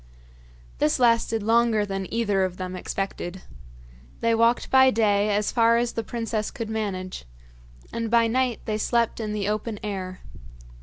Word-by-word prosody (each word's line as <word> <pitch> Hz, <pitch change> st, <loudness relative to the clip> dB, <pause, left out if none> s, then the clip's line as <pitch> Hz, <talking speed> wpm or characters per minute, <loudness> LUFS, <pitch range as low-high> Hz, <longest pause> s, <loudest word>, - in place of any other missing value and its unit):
This 150 Hz, -, +2 dB
lasted 230 Hz, -3 st, +2 dB
longer 225 Hz, -1 st, +3 dB
than 195 Hz, -2 st, -4 dB
either 205 Hz, -4 st, +1 dB
of 185 Hz, -1 st, -3 dB
them 185 Hz, 0 st, -5 dB
expected. 190 Hz, -1 st, -4 dB, 0.8 s
They 230 Hz, 0 st, +2 dB
walked 230 Hz, +1 st, +2 dB
by 265 Hz, 0 st, +7 dB
day 210 Hz, -3 st, +2 dB
as 205 Hz, 0 st, +1 dB
far 230 Hz, -1 st, +4 dB
as 240 Hz, 0 st, 0 dB
the 230 Hz, -, -2 dB
princess 225 Hz, -1 st, -3 dB
could 225 Hz, -2 st, -6 dB
manage, 190 Hz, -, -4 dB, 0.7 s
and 230 Hz, -1 st, -2 dB
by 230 Hz, 0 st, +4 dB
night 250 Hz, +1 st, 0 dB
they 215 Hz, -1 st, -2 dB
slept 235 Hz, +1 st, +1 dB
in 215 Hz, -2 st, -3 dB
the 205 Hz, -2 st, -2 dB
open 215 Hz, +1 st, -2 dB
air. 185 Hz, -3 st, -5 dB
220 Hz, 155 wpm, -25 LUFS, 200-230 Hz, 0.8 s, by